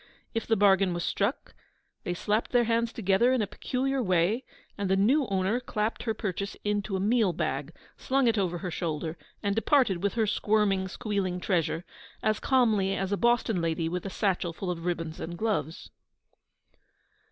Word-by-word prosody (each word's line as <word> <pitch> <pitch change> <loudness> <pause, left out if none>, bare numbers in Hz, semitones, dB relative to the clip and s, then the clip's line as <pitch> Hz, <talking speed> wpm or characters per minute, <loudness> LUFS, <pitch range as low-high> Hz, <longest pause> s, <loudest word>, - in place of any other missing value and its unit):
If 225 - -2
the 225 - +3
bargain 195 -2 +4
was 175 - -2
struck, - - -1 0.5
they 175 - -1
slapped 210 +5 0
their 245 -1 +5
hands 230 0 +1
together 215 +3 +2
in 260 -3 +2
a - - 0
peculiar 265 +6 -2
way, 185 +4 +2 0.3
and 200 -2 -2
the 190 - +4
new 250 +8 +3
owner 195 +4 +1
clapped 215 -3 -2
her 225 -2 -2
purchase 200 -1 -4
into 205 -1 -1
a - - 0
meal 210 -1 +2
bag, - - -2 0.3
slung 270 -1 +1
it 230 - +3
over 180 -4 0
her 180 0 -5
shoulder, 160 -1 -3 0.3
and 200 -1 +1
departed 225 - +3
with 200 +2 0
her 225 -2 +2
squirming, 205 -2 +1
squealing 190 -2 -2
treasure 175 -2 0 0.4
as 215 -1 +1
calmly 215 -7 +2
as 195 0 -2
a - - +3
Boston 235 -5 +2
lady 165 0 0
with 180 +1 -3
a 195 - -4
satchel 185 -3 -1
full 180 +2 -3
of 170 -1 -6
ribbons 165 -2 -3
and 170 +1 -5
gloves. 180 -8 -2
200 Hz, 175 wpm, -28 LUFS, 180-225 Hz, 0.5 s, their